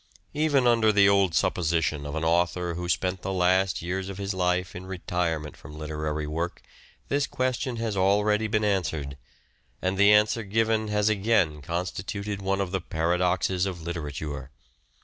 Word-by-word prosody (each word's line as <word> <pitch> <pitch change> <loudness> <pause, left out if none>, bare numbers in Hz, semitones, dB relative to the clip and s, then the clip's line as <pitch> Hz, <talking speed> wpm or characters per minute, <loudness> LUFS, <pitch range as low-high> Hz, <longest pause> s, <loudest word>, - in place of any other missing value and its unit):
Even 145 -3 +2
under 115 -2 +4
the 100 -1 +5
old 100 -4 +3
supposition 80 -2 0
of 70 - -5
an 80 - -2
author 85 +1 +1
who 90 +1 -4
spent 90 0 0
the 95 - -3
last 95 -1 +2
years 95 +2 -3
of 95 - -6
his 100 0 -3
life 90 0 0
in 90 +1 -7
retirement 85 -4 -2
from 75 +1 -12
literary 75 0 -3
work 85 +4 -4 0.4
this 140 0 0
question 130 -1 -1
has 115 -2 -2
already 105 +3 +2
been 110 0 0
answered, 80 -8 -1 0.6
and 95 +1 -1
the 100 +1 +7
answer 105 +2 +4
given 110 +1 +1
has 105 0 +1
again 100 -8 +2
constituted 95 +5 -4
one 95 0 0
of 95 -2 -3
the 95 -1 -1
paradoxes 90 +3 0
of 85 -4 -6
literature. 75 -4 -5
95 Hz, 160 wpm, -26 LUFS, 85-105 Hz, 0.6 s, the